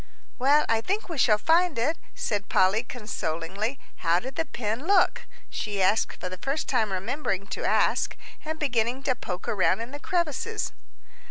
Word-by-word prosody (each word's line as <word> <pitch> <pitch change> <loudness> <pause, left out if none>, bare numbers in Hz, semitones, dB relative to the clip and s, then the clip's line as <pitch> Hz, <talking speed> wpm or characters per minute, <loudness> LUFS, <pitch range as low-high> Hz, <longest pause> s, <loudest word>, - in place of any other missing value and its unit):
"Well, 285 +4 +5
I 225 -1 +2
think 395 - -2
we 325 -5 -3
shall 215 -4 +5
find 330 +5 +3
it," 270 +8 +1 0.2
said 205 -2 -2
Polly, 190 +4 +4
consolingly. 210 - -3 0.2
"How 170 -1 +3
did 260 +7 -7
the 325 - -1
pin 230 +5 -3
look?" 395 -3 +3 0.2
she 205 -2 -3
asked, 200 +4 +2
for - - -4
the 185 0 -7
first 275 +7 -2
time 225 -6 +1
remembering 195 0 -2
to - - -4
ask, - - +2 0.3
and 315 +1 -3
beginning 250 -3 0
to 270 - +2
poke 185 -6 -6
around 190 -1 +2
in 230 +2 -5
the 290 - -7
crevices. 350 - -1
240 Hz, 170 wpm, -27 LUFS, 205-295 Hz, 0.3 s, Well